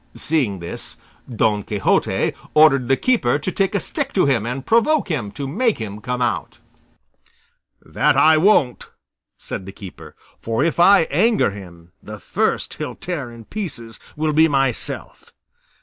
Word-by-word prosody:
Seeing 135 -11 0
this, 85 -1 -4 0.3
Don 110 -3 +1
Quixote 100 -1 0 0.2
ordered 140 -5 +5
the 135 +1 +2
keeper 230 - +1
to 150 +6 -4
take 195 +1 0
a - - +2
stick 275 - -2
to 190 - +3
him 120 -6 +1
and 130 +2 -5
provoke 235 - +2
him 125 - -2
to 140 - -5
make 220 - 0
him 105 -2 -7
come 125 +2 -2
out. 120 - -3 1.3
"That - - +1
I 160 0 +6
won't," 155 - +2 0.5
said 95 - -7
the - - -7
keeper; 90 -6 -12 0.2
"for 115 +4 -1
if 165 +1 -1
I 195 +2 +7
anger 225 - +2
him, 90 -4 -12
the 110 0 -9
first - - -2
he'll - - -5
tear 155 -9 -5
in 115 -1 -13
pieces 130 - -7 0.2
will 155 0 0
be 160 +2 +5
myself. 135 -5 -2
135 Hz, 155 wpm, -20 LUFS, 110-170 Hz, 1.3 s, I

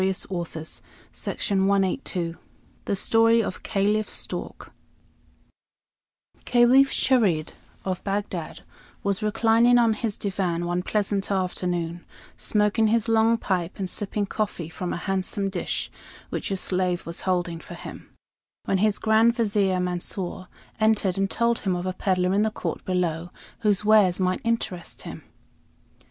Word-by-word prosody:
ARABIAN 190 0 +2
STORIES 170 -4 -3 0.3
THE 190 -2 -2
STORY 225 +3 +4
OF 185 - -5
CALIPH 205 +2 0
STORK - - -5 1.7
Caliph 250 +3 +5
Charid, 200 - +2 0.3
of 185 -2 -2
Bagdad, 200 +1 -3 0.4
was 200 +1 0
reclining 225 +3 +4
on 230 -2 +4
his 215 -1 -3
divan 185 -4 -1
one 175 +1 0
pleasant 200 0 -1
afternoon, 180 -3 -2 0.3
smoking 210 +1 +2
his 230 +1 +2
long 225 0 +4
pipe 185 -5 -2
and 195 - -2
sipping 205 +2 -1
coffee 200 -5 -3
from 175 +2 -4
a - - -2
handsome 195 +1 -1
dish 180 - -3 0.4
which - - -3
a 195 - -1
slave 180 -1 -1
was 170 0 -6
holding 175 -3 -1
for - - -10
him, - - -10 0.6
when 190 - +1
his 215 0 +3
Grand 225 +2 +4
Vizier, 200 -5 +1
Mansor, 180 +1 -3 0.3
entered 210 -4 +2
and 195 0 +1
told 235 +2 +1
him 190 -3 -1
of 175 +1 -3
a 185 - -1
peddler 185 -1 +1
in 200 - +3
the 220 - +2
court 215 - -4
below 175 -2 -1 0.3
whose 210 -3 +1
wares 210 -4 +5
might 185 0 0
interest 230 -6 -2
him. - - -8
195 Hz, 135 wpm, -25 LUFS, 180-215 Hz, 1.7 s, Caliph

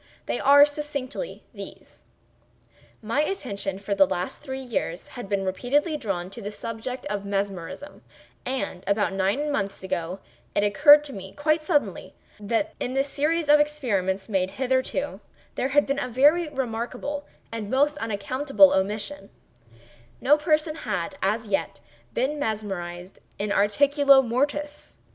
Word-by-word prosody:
They - - -2
are, 285 +1 +8
succinctly, 295 - -5
these: - - -11 1.0
My 230 +7 +1
attention, 200 - -3
for 200 +1 -3
the 195 -1 +5
last 180 -1 -3
three 265 -2 -5
years, 195 -8 -3
had 245 -6 -8
been 200 -1 0
repeatedly 275 - 0
drawn 195 -9 -3
to 230 - -8
the 205 - -4
subject 230 +4 -6
of 205 -1 -3
Mesmerism; 200 - -4 0.4
and, 255 -8 -3
about 200 -2 +1
nine 200 +11 0
months 195 -8 -2
ago 180 -1 -3 0.4
it 205 - +3
occurred 290 +8 +7
to 285 -2 -8
me, 190 -2 -8
quite 310 +2 +1
suddenly, 305 -2 -1 0.2
that 230 +10 -1
in 255 - -3
the 270 - +3
series 300 +3 0
of 295 0 +7
experiments 210 -11 0
made 190 -4 0
hitherto, 260 0 -1 0.3
there 260 - -1
had 290 +2 +3
been 275 +1 -1
a 250 - -2
very 295 +7 +4
remarkable 260 +2 -4 0.2
and 225 -3 -5
most 285 +4 +2
unaccountable 260 +7 +3
omission:—no 190 - -3
person 305 0 +1
had 200 - -3
as 215 +4 0
yet 195 - -1 0.4
been 280 +5 0
mesmerized 195 -7 -4 0.2
in 205 0 -2
articulo 275 +7 +5
mortis. 290 +5 -2
240 Hz, 140 wpm, -25 LUFS, 195-290 Hz, 1.0 s, are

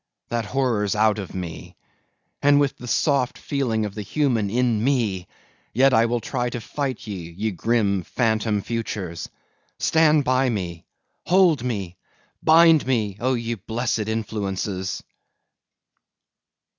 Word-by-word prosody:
that 115 -2 -1
horror's 110 -4 0
out 110 0 +3
of 95 -2 -7
me! 90 -3 -7 0.7
and 145 0 +5
with 140 -1 +1
the 125 - -10
soft 135 +1 +1
feeling 120 -6 -1
of 105 - -5
the 105 - -5
human 115 -1 0
in 115 -1 +1
me, 115 -9 0 0.5
yet 135 +2 +5
will 115 +1 +3
I 115 - -8
try 120 0 -1
to 120 - -4
fight 130 +2 -4
ye, 95 -6 -6
ye 105 +6 -3
grim, 100 0 +1
phantom 110 0 0
futures! 105 -7 -4 0.5
Stand 155 -2 +3
by 130 0 +2
me, 90 -7 -4 0.4
hold 175 -6 +4
me, 100 -8 -3 0.4
bind 160 -2 +6
me, 110 -7 0
O 130 +2 +1
ye 115 0 -2
blessed 115 +1 -2
influences! 100 -4 -3
115 Hz, 130 wpm, -23 LUFS, 100-130 Hz, 0.7 s, bind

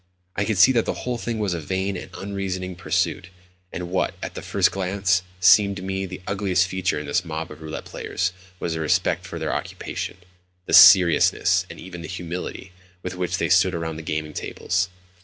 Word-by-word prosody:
I 100 - 0
could 110 -2 -1
see 130 - +7
that 115 -3 +2
the - - -4
whole 125 -1 -2
thing 115 0 -3
was 105 -4 -1
a 85 - -3
vain 95 +5 -2
and - - -7
unreasoning 95 -2 -4
pursuit; 90 0 -1 0.4
and 90 -1 -6
what, 95 - 0
at - - -5
the - - -6
first - - +2
glance, 95 -1 +1 0.2
seemed 100 +2 +6
to 95 - -7
me 95 0 -3
the 90 0 -9
ugliest 95 -3 +1
feature 95 0 -1
in 75 - -6
this 70 +5 0
mob 80 -1 -5
of - - -11
roulette 80 0 -6
players 90 -1 -3 0.3
was 85 - -2
their 80 - -3
respect 90 +2 +1
for 85 - -6
their 80 -1 -2
occupation—the 90 0 -7
seriousness, 90 -5 +7
and - - -10
even 90 0 -9
the 85 - -7
humility, 90 +1 -6 0.3
with 90 - -4
which 90 -1 -2
they - - 0
stood - - +4
around 80 -1 -4
the - - -6
gaming 75 -1 -3
tables. 95 +4 -2
90 Hz, 195 wpm, -23 LUFS, 85-95 Hz, 0.4 s, see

